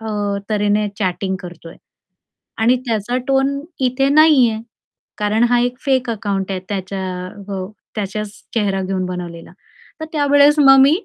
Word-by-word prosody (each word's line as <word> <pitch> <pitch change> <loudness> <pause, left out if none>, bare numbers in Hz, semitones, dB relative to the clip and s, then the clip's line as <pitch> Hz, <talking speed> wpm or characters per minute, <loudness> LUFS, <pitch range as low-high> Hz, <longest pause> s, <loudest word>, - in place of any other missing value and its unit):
अ, 205 -2 -2
तऱ्हेने 210 0 +1
चॅटिंग 190 0 -1
करतोय. 175 -2 -11 0.8
आणि 230 +3 +3
त्याचा 230 +2 -1
टोन 270 +1 +1 0.3
इथे 270 +2 +1
नाहीये. 285 -7 +5 0.6
कारण 210 +2 +1
हा 245 0 +3
एक 245 +1 -1
फेक 260 -3 +1
अकाउंट 200 -3 -2
आहे 185 - -2
त्याच्या 190 -1 -3 0.4
हो, 190 -2 -4 0.3
त्याच्याच 210 0 -3 0.2
चेहरा 195 -3 0
घेऊन 185 -1 -2
बनवलेला. 175 -2 -7 0.5
तर - - -3
त्यावेळेस 285 0 +4
मग 270 -1 +7
मी 275 +2 +6
210 Hz, 135 wpm, -18 LUFS, 195-260 Hz, 0.8 s, मग